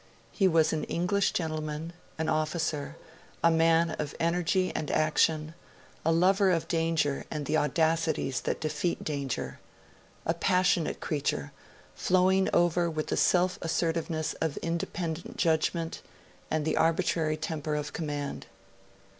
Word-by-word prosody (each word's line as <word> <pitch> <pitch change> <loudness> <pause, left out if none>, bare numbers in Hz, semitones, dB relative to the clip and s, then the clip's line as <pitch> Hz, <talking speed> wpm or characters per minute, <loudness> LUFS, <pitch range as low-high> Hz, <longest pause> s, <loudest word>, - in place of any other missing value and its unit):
He 195 - +3
was 160 -3 +3
an 155 - -1
English 195 +3 +1
gentleman, 155 0 -3 0.2
an 160 0 -1
officer, 155 -1 -1 0.5
a 170 - +6
man 165 0 +3
of 150 -1 -3
energy 180 +2 +1
and 150 - -2
action, 155 0 +2 0.5
a 165 - +2
lover 190 +4 +4
of 170 -3 +1
danger 165 -4 0
and 150 -2 -4
the 155 +2 +1
audacities 160 -2 +1
that - - -2
defeat 165 +2 -2
danger; 140 -4 -3 0.7
a 165 - +2
passionate 180 -1 +1
creature, 140 - -2 0.4
flowing 185 +1 +3
over 175 0 +3
with 155 -1 -3
the - - +1
self 180 +2 +2
assertiveness 165 -1 -1
of 160 -3 -1
independent 165 0 -3
judgment 165 0 0 0.5
and 155 -1 0
the - - 0
arbitrary 160 -1 +1
temper 155 -1 -3
of 150 0 -3
command. 145 -3 -4
160 Hz, 130 wpm, -29 LUFS, 155-170 Hz, 0.7 s, a